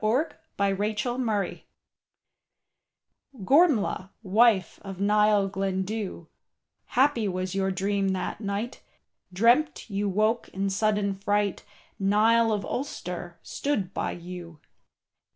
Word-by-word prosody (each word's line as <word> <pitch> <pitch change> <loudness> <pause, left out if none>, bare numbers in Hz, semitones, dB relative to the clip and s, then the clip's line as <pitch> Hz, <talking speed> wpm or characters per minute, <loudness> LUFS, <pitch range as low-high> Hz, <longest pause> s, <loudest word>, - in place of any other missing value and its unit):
DEATH 245 +9 +1 0.2
OF 200 -1 +1 0.2
GORMLAITH 230 -5 -1 1.8
Gormlaith, 265 - +3
wife 205 -2 +3
of 195 -2 -8
Niall 210 0 +3
Glendu, 195 -1 -3 0.6
Happy 255 -4 +2
was 185 -1 -3
your 195 0 0
dream 195 +1 0
that 190 +3 -3
night, 205 +4 -3 0.5
Dreamt 235 - +2
you 200 +1 0
woke 215 +4 +1
in 195 +1 -2
sudden 205 0 +1
fright, 205 0 -1 0.4
Niall 220 +3 +4
of 210 -2 -1
Ulster 180 -9 -5
stood 205 -10 -2
by - - -1
you. 175 -2 -9
200 Hz, 100 wpm, -27 LUFS, 190-225 Hz, 1.8 s, Niall